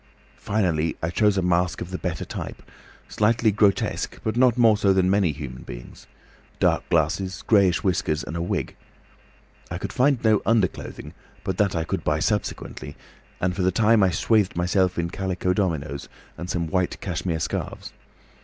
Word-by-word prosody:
Finally 85 -7 0
I 80 - 0
chose 105 +1 +2
a 95 - +1
mask 90 -1 +1
of 90 - -6
the 90 - -4
better 85 -5 -3
type, - - -7 0.4
slightly 110 +1 +2
grotesque 100 -1 +1
but 110 - -1
not 125 -1 +4
more 115 -3 +6
so 100 -2 +3
than 95 -1 +2
many 100 -5 +3
human 65 -4 -7
beings, - - -11 0.5
dark - - +1
glasses, 90 +4 0
greyish 100 -5 +3
whiskers, 80 -5 0
and 80 - -6
a 85 - -2
wig. 85 - -2 0.9
I - - -4
could - - -5
find 135 +2 +3
no 110 -2 +4
underclothing, 110 -4 -1 0.3
but 95 -2 -3
that 100 -3 +2
I 80 - 0
could - - -3
buy - - +1
subsequently, - - -3 0.4
and 90 0 0
for 95 - -2
the 90 - +3
time 110 +3 +4
I 95 - +5
swathed 105 +2 +2
myself 90 +1 +1
in 85 0 -1
calico 95 -1 -1
dominoes 75 -8 -2 0.3
and 85 +2 -7
some 85 -2 -1
white 90 +2 -1
cashmere 90 -2 -2
scarfs. - - -4
95 Hz, 170 wpm, -24 LUFS, 85-105 Hz, 0.9 s, more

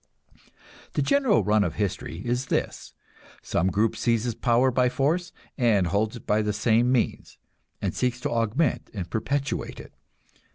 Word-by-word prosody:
The - - +1
general 275 - +3
run 105 +1 +3
of 85 - -2
history 95 -4 -3
is 125 +2 -1
this: - - -3 0.5
some 90 - 0
group 105 +4 +1
seizes 115 +1 0
power 125 +3 +2
by 125 0 +2
force, 165 +8 0 0.3
and 110 -7 +3
holds 105 +6 0
it 120 - -11
by 105 +1 +2
the 105 -1 -1
same 115 +4 +2
means, 125 -3 -1 0.5
and - - 0
seeks 125 -1 -1
to - - -2
augment 115 +6 0
and 90 -4 -4
perpetuate 140 +5 -2
it. - - -12
115 Hz, 155 wpm, -26 LUFS, 105-125 Hz, 0.5 s, general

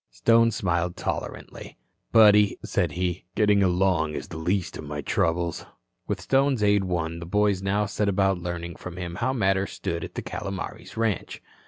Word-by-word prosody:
Stone 115 - +4
smiled 85 -4 -1
tolerantly. - - -5 0.3
"Buddy," 105 -2 +6
said - - 0
he, 90 -1 -2
"getting 105 -1 +4
along 90 -4 +2
is - - -6
the 80 - -7
least 90 +3 -1
of - - -6
my 75 0 -5
troubles." 85 +3 0 0.4
With - - -2
Stone's 135 -4 +2
aid 100 -1 +3
won, 85 -2 -2
the 85 - -8
boys 105 0 +2
now 100 +2 +1
set 100 0 -1
about 95 -1 +2
learning 85 -1 -5
from 90 -1 -8
him 90 -1 -5
how 120 +5 0
matters 95 -5 0
stood 85 0 -3
at - - -8
the - - -4
Calomares 100 +3 -6
ranch. 110 -3 -1
95 Hz, 170 wpm, -25 LUFS, 85-105 Hz, 0.4 s, Buddy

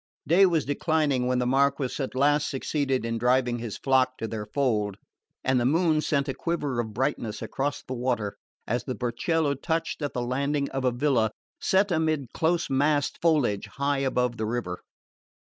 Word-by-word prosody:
Day 190 +4 +6
was 165 -4 +1
declining 145 -3 +1
when 125 0 +1
the 125 - +1
Marquess 135 +1 +1
at 135 -2 -3
last 145 +2 +3
succeeded 135 -2 -1
in 115 0 -2
driving 125 0 +2
his 115 -3 -5
flock 130 -1 +2
to 115 - -3
their 110 -2 -5
fold, 105 -8 0 0.5
and 130 -1 +2
the - - +1
moon 160 +2 +3
sent 140 -2 0
a 135 - -1
quiver 150 -7 -2
of 110 -2 -2
brightness 110 -2 -2
across 140 +1 -3
the 130 - -6
water 120 -5 -1 0.3
as 120 +2 -1
the 130 - -3
burchiello 140 +6 0
touched 160 +4 -2
at 145 - -2
the 125 - -1
landing 140 +3 0
of 135 -1 -2
a 125 - +3
villa 120 -3 +2 0.3
set 195 +1 +2
amid 155 -6 0
close 170 +1 +1
massed 145 +2 +1
foliage 145 -12 +2
high 140 0 0
above 125 -3 0
the 110 0 -2
river. 110 -6 -3
135 Hz, 180 wpm, -26 LUFS, 120-150 Hz, 0.5 s, Day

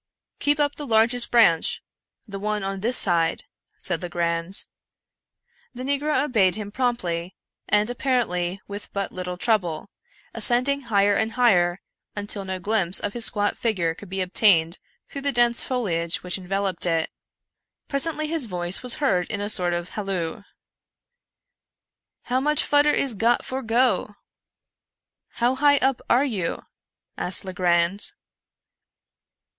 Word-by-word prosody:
" - - -56
Keep 290 +1 +1
up 290 -1 +1
the 295 - -8
largest 235 +1 +4
branch 220 -9 +3 0.2
— - - -44
the 200 -1 -7
one 210 0 -2
on 195 0 -3
this 235 +5 -1
side," 170 -3 +2 0.4
said 175 -3 -2
Legrand. 170 +1 -1 1.1
The 250 - -6
negro 285 +1 0
obeyed 205 -11 +2
him 210 -1 -6
promptly, 190 -8 -2 0.3
and 210 0 +3
apparently 225 -8 -1
with 205 +1 -7
but 200 -1 -3
little 180 -1 -5
trouble; 185 -5 -1 0.4
ascending 270 +3 +1
higher 200 -1 +3
and 220 +1 -1
higher, 185 -8 +2 0.3
until 205 -1 -4
no 190 0 -4
glimpse 190 -2 +2
of 205 - -4
his 235 -2 +2
squat 205 -1 0
figure 180 -8 0
could 190 +3 -13
be 190 0 -3
obtained 180 -3 +3 0.3
through 275 - -7
the 280 0 0
dense 240 -2 +2
foliage 170 -10 -2
which 180 +1 -2
enveloped 190 -1 -2
it. 165 -2 0 0.8
Presently 310 +2 +2
his 310 -5 -1
voice 175 -1 -1
was 250 -1 +2
heard 195 -12 0
in 205 - -3
a 205 +1 -2
sort 180 -4 +2
of 175 +1 -4
halloo. 195 -6 -4 0.9
" - - -64
How 250 +1 0
much 300 +3 +1
fudder 290 0 +3
is 275 -4 +1
got 230 +3 +1
for 260 +1 -4
go? 230 -2 +1 0.4
" - - -57
" - - -54
How 240 +2 +2
high 285 +1 +4
up 265 -2 0
are 255 +4 +4
you? 200 -11 -3 0.3
" - - -57
asked 180 +2 +3
Legrand. 180 - +1
205 Hz, 150 wpm, -23 LUFS, 180-245 Hz, 1.1 s, largest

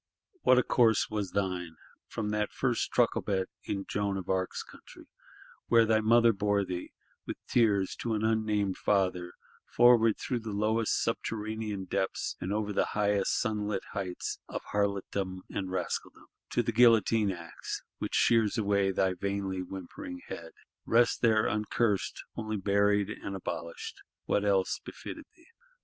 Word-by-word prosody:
What 130 - +5
a 125 - +5
course 115 -4 +3
was 105 -3 -2
thine: 90 -4 -2 0.3
from 105 -2 -3
that 105 0 -1
first 125 -3 -1
trucklebed 105 -5 +1 0.2
(in 100 -1 -3
Joan 100 -1 -1
of 95 - -6
Arc's 95 -1 -1
country) - - -15 0.6
where 115 -1 +5
thy 110 0 +3
mother 115 +1 +5
bore 100 0 +1
thee, 90 -1 -5 0.4
with - - -4
tears, 100 -5 +2
to 115 -2 -1
an 110 +1 0
unnamed 105 -3 0
father: 90 -3 +1 0.3
forward, 120 -2 +5
through 125 -3 -2
lowest 110 +1 0
subterranean 110 -3 -3
depths, 95 0 -2
and 90 - -3
over 105 0 -1
highest 105 -2 +1
sunlit 105 -3 -1
heights, 95 -3 -4
of - - -5
Harlotdom 100 -2 -1
and 95 -2 -3
Rascaldom—to 95 - -4
the - - -1
guillotine 115 -2 +5
axe, 85 -2 -6 0.2
which - - -3
shears 115 -1 +3
away 100 -2 +2
thy 95 -1 +1
vainly 95 0 -2
whimpering 95 - -7
head! 80 -1 -7 0.3
Rest 120 +1 +3
there 110 -2 +4
uncursed; 105 0 0
only 110 -1 -3
buried 100 +1 +2
and 100 - -6
abolished: 85 -3 -6 0.2
what 100 - +1
else 100 -2 +1
befitted - - -8
thee? 335 - -22
105 Hz, 140 wpm, -30 LUFS, 95-110 Hz, 0.6 s, What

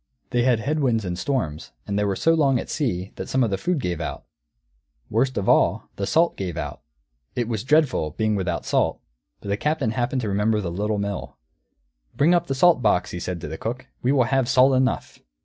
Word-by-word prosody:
They 120 - +2
had 120 -2 +2
head 150 +6 -1
winds 115 -7 +1
and 90 -1 -2
storms, 85 - -3
and 100 - -4
they - - +2
were 100 -1 0
so 165 - +3
long 140 -5 +3
at - - -6
sea 95 - -2
that - - -6
some 130 0 +2
of 115 - 0
the 95 - 0
food 180 - 0
gave 90 - -2
out. - - -5 0.9
Worst 130 +4 +1
of 100 - -1
all, - - +2
the 100 - -2
salt 170 +1 +3
gave 90 -4 -4
out. 75 -3 -5 0.5
It 120 -2 -1
was 110 -3 -2
dreadful, 135 - +2
being 110 +8 -1
without 90 -3 -2
salt. - - +1 0.4
But 100 - -7
the 100 - 0
Captain 145 -4 0
happened 125 +2 -1
to 110 - -3
remember 105 +2 +1
the 90 -5 -3
Little 105 +4 -1
Mill. 100 -1 -4 0.8
"Bring 160 +5 +4
up 175 -1 +2
the 135 - -1
salt 165 0 +5
box!" 105 -5 +2
he 90 - -5
said 90 0 -4
to - - -5
the 80 +1 -6
cook. 125 +3 -4 0.2
"We 125 - +2
will 135 -3 +4
have 130 0 +1
salt 135 0 +5
enough." 130 0 0
115 Hz, 220 wpm, -23 LUFS, 100-135 Hz, 0.9 s, salt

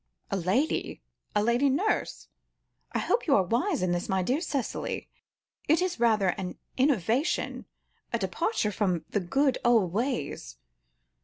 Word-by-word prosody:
"A - - +1
lady? 195 - 0 0.4
A 210 - +3
lady 240 +5 +3
nurse? 370 +11 -1 0.6
I - - -1
hope 475 - 0
you 280 - +5
are 195 - +4
wise 250 - 0
in 180 - +1
this, 175 0 -2
my 190 -1 +1
dear 260 - 0
Cicely; 280 -7 -3 0.6
it 315 +3 +4
is 365 -7 -1
rather 215 -5 +3
an 180 0 -4 0.2
innovation, 260 - +1 0.5
a - - +1
departure 220 - -1
from 185 -5 0
the 205 - +1
good 265 +9 +1
old 225 -8 +3
ways. 160 - -2
235 Hz, 145 wpm, -28 LUFS, 185-280 Hz, 0.6 s, you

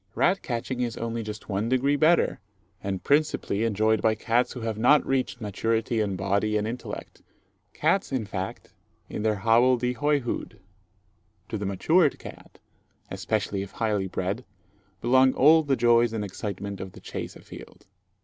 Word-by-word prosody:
Rat 190 +2 +2
catching 125 +1 -3
is 120 -2 -2
only 115 0 -3
just 105 0 -7
one 105 +3 -1
degree 130 +3 +2
better, 160 +4 +3 0.4
and 95 -2 -3
principally 145 -7 +1
enjoyed 110 0 +2
by 110 -1 +3
cats 120 +3 +1
who 125 - -7
have 110 -1 -3
not 145 +6 +5
reached 130 -2 -1
maturity 115 +2 -1
in 100 -2 -1
body 100 +3 0
and 105 0 -1
intellect 120 +3 -7 0.5
cats, 195 - +1
in 130 -5 -1
fact, 95 -1 -6 0.4
in - - -4
their 110 0 +1
hobble 115 +5 +4
de 125 +1 -1
hoy 145 +4 +1
hood. 120 - -5 0.9
To 110 - -3
the 100 - -3
matured 155 - +2
cat, - - -12 0.5
especially 105 -2 -2
if 100 - -8
highly 105 -4 -1
bred, 95 +6 -3 0.6
belong 130 +2 +4
all 155 +4 +6
the 140 -3 +1
joys 120 -1 +3
and 105 -2 -2
excitement 100 0 -5
of 95 -1 -7
the - - -12
chase - - -6
a - - -13
field. - - -13
115 Hz, 165 wpm, -26 LUFS, 105-130 Hz, 0.9 s, all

